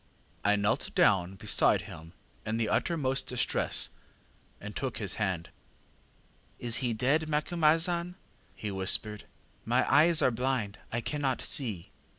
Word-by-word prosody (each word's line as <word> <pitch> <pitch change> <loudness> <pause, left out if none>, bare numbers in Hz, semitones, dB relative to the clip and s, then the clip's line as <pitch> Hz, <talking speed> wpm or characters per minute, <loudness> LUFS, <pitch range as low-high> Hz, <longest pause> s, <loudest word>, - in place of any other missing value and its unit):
ŌĆ£I 105 0 +3
knelt 100 +2 -1
down 95 -1 +3
beside - - +3
him 80 +1 -11 0.3
in 110 +1 -2
the 115 -2 0
uttermost 135 -6 0
distress, 125 -1 0 0.7
and 105 +1 -8
took 130 -3 -3
his 105 -5 -2
hand. 95 -5 -2 1.1
ŌĆ£ŌĆśIs 120 -1 -1
he 125 -3 0
dead, 145 +7 +1
Macumazahn? 165 +3 +2
ŌĆÖ 180 - -12 0.4
he 105 - -5
whispered. 100 +2 0 0.4
ŌĆśMy 125 +3 +2
eyes 160 +2 +5
are - - +4
blind; 115 -5 -2
I 120 - -2
cannot 140 -1 -2
see. 110 - -2
120 Hz, 135 wpm, -29 LUFS, 105-150 Hz, 1.1 s, eyes